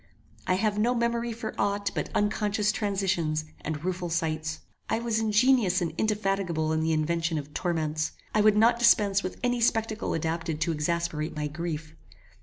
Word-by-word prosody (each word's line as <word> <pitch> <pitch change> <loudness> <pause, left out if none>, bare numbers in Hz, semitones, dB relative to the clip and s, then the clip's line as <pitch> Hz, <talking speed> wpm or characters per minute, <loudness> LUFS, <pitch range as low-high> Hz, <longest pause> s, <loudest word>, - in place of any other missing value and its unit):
I 185 - +3
have 210 +1 0
no 240 +3 +2
memory 235 0 0
for 220 -1 -5
ought 200 0 0
but - - -3
unconscious 210 0 +1
transitions 190 -7 -1 0.2
and 155 0 -4
rueful 180 -1 -2
sights. 160 -1 -2 0.3
I - - +2
was 230 -1 0
ingenious 220 -3 +3
and 170 -3 -2
indefatigable 195 -7 0
in 160 - +1
the 160 +1 +1
invention 165 +1 0
of 150 0 -6
torments. 155 -3 -1 0.2
I 215 - +4
would 210 0 +5
not 230 +2 +4
dispense 205 -4 +4
with 185 - -5
any 245 -1 +1
spectacle 225 -1 +1
adapted 165 0 -2
to 170 +1 +1
exasperate 160 0 -1
my 150 0 -2
grief. 155 0 -4
185 Hz, 165 wpm, -27 LUFS, 160-215 Hz, 0.3 s, would